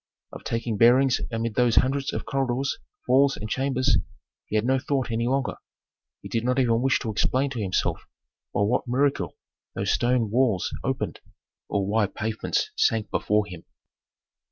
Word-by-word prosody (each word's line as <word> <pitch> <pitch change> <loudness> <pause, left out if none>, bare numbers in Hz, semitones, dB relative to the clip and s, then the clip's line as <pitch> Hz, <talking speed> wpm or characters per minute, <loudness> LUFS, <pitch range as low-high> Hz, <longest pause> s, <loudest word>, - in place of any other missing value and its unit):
Of - - -9
taking 115 -1 -2
bearings 125 +4 +5
amid 115 -1 -2
those 120 0 +2
hundreds 135 +1 +2
of - - -4
corridors, 135 0 -1 0.3
halls, 135 +2 +4
and 105 - -5
chambers, 130 -2 +1 0.5
he - - -4
had 110 +1 +2
no 130 +1 +2
thought 135 -3 -1
any 115 +1 0
longer. 135 +1 0 0.7
He - - -6
did 115 - -1
not 125 +1 +1
even 120 -3 +2
wish 135 0 +3
to 110 - -2
explain 130 +6 +1
to 120 -4 -3
himself 95 -3 -1 0.4
by - - -1
what 120 +6 +1
miracle 135 +3 0 0.4
those - - 0
stone 120 -3 +1
walls 115 -6 +1
opened, - - -2 0.5
or 100 -1 0
why 105 +1 +2
pavements 110 +2 -2
sank 110 -2 +1
before 105 0 +1
him. 90 -4 -10
120 Hz, 160 wpm, -25 LUFS, 110-130 Hz, 0.7 s, bearings